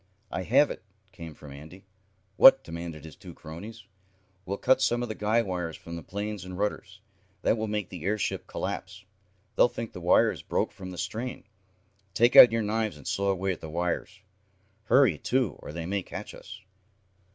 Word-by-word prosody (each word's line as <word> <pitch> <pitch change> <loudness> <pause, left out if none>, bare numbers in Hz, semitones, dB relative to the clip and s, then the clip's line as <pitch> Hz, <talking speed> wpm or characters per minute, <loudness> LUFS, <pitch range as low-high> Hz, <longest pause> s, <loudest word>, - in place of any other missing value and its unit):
"I - - -2
have 135 +10 +3
it!" - - -7 0.3
came 80 -4 -10
from 75 - -12
Andy. 80 +7 -12 0.5
"What?" 135 +4 +8
demanded 85 -2 -7
his 80 - -11
two - - -12
cronies. 100 +7 -10 0.6
"We'll 100 +2 -2
cut 130 +4 +3
some 120 -1 +1
of 120 - -4
the - - -2
guy 110 +2 +1
wires 90 -5 -4
from 85 - -9
the 85 - -6
planes 100 +3 -5
and 90 0 -8
rudders. 105 +1 -3 0.4
That - - +3
will 110 -1 -3
make 105 -3 -3
the 90 -4 -8
airship 105 +2 -2
collapse. 95 +2 -5 0.5
They'll - - +5
think 115 -2 -6
the 90 - -8
wires 90 +1 +3
broke - - -1
from 95 -1 -9
the 90 - -8
strain. 120 +7 -4 0.7
Take 120 +4 +4
out 120 - +11
your 115 -1 0
knives 110 -3 -1
and 70 - -12
saw 100 0 0
away 95 0 0
at 90 - -6
the 80 - -7
wires. 90 +3 -3 0.6
Hurry, 115 - +4
too, 125 -5 0
or - - -9
they 85 +1 -5
may 100 +3 -1
catch - - -8
us." 105 +2 -11
95 Hz, 185 wpm, -27 LUFS, 85-110 Hz, 0.7 s, out